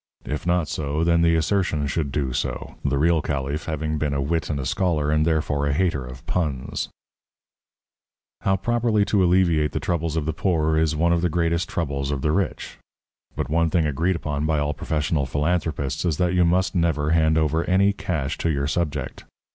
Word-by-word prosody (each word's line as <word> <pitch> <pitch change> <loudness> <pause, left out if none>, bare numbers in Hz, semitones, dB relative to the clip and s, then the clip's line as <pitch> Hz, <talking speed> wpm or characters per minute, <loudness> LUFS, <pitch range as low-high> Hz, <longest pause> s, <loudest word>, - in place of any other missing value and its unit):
If 75 +3 -4
not 85 -2 +2
so, 75 +1 -2
then 85 0 +3
the 85 0 +4
assertion 80 -3 +1
should 70 0 -2
do 65 -3 -1
so, - - -3
the 70 0 +1
real 80 +2 +3
caliph 70 +1 -3
having 80 -1 -2
been 75 -2 -1
a - - 0
wit 80 +4 -1
and 75 -2 -1
a 65 - -3
scholar 75 -1 0
and 75 +1 +2
therefore 75 -3 0
a 70 - +1
hater 80 -4 0
of 65 +1 -10
puns. 75 -8 -2 1.5
How 95 - +1
properly 115 0 +1
to 100 -2 +2
alleviate 85 -5 +3
the - - -1
troubles 80 -2 -1
of 75 - -1
the 80 - -1
poor 80 -2 +1
is 80 -1 +2
one 85 +2 +2
of 85 - +1
the 90 - +1
greatest 85 0 0
troubles 70 -4 -2
of 70 -2 -2
the 75 - +2
rich. 95 0 -2 0.6
But - - -2
one 80 +2 +2
thing 80 0 +2
agreed 80 +6 0
upon 75 -2 -2
by 80 -1 +1
all 75 0 0
professional 75 -1 -1
philanthropists 75 -1 -1
is 85 -5 0
that 90 0 +1
you 90 -1 +4
must 90 +1 +2
never 80 -4 +1
hand 80 -1 +3
over 80 +1 +1
any 100 +2 +3
cash 75 -8 -3
to 85 - 0
your 70 -2 0
subject. 75 -3 -3
80 Hz, 195 wpm, -23 LUFS, 75-85 Hz, 1.5 s, the